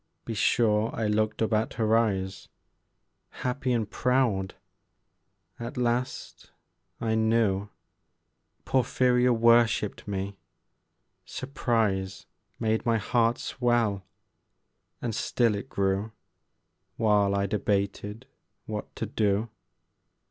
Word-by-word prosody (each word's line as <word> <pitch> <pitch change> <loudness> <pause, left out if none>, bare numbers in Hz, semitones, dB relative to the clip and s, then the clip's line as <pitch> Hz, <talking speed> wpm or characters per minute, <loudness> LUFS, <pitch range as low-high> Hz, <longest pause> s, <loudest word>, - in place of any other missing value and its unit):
Be 115 - -4
sure 110 0 +2
I 110 - -1
looked 110 +1 +1
up 110 - 0
at 110 +5 0
her 110 -2 +2
eyes 95 -4 0 1.0
Happy 125 +1 -1
and 115 -4 +1
proud; 110 -6 0 1.0
at 120 +1 -6
last 125 +1 -2 0.5
I 110 -1 0
knew 110 -3 +2 1.0
Porphyria 125 -1 +2
worshipped 115 -3 +3
me; 100 0 -4 0.9
surprise 110 -8 -1 0.3
Made 110 -1 0
my 115 -1 +2
heart 115 +2 +1
swell, 120 -6 0 1.0
and 120 -2 -1
still 115 +1 +1
it 100 - -5
grew 100 +2 0 0.9
While 105 -3 +3
I 100 0 +1
debated 105 +3 -2 0.4
what 105 -1 -6
to - - -3
do. 105 +1 0
110 Hz, 100 wpm, -27 LUFS, 100-120 Hz, 1.0 s, worshipped